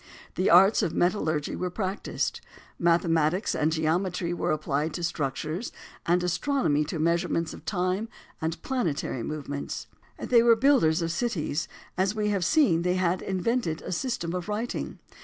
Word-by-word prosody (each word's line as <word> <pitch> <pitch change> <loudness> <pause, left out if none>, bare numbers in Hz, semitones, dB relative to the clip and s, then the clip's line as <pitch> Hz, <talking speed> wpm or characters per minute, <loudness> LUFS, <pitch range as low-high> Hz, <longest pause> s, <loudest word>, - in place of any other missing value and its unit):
The 185 - +1
arts 195 +6 +6
of 185 -6 -1
metallurgy 160 -5 0
were 180 - -2
practised. 190 +1 -3 0.4
Mathematics 170 +1 +2
and 155 +1 +1
geometry 170 +2 0
were - - -1
applied 150 0 -1
to 175 - -4
structures, 155 - -2 0.4
and 175 +1 +3
astronomy 180 - +1
to 160 - -4
measurements 170 +1 0
of - - -12
time 185 +3 -1 0.3
and 160 +1 -2
planetary 160 - -1
movements. 145 +2 -5 0.3
They 235 -2 +4
were 230 0 +6
builders 225 - +3
of 165 - -1
cities. 170 -6 -1 0.3
As 190 +2 +1
we 210 -1 0
have 200 -3 0
seen, 180 - +3
they 180 +1 +1
had 185 0 +1
invented 190 -2 -1
a - - -5
system 180 -4 -2
of 180 +2 -4
writing. 220 +3 -3
175 Hz, 150 wpm, -27 LUFS, 160-200 Hz, 0.4 s, arts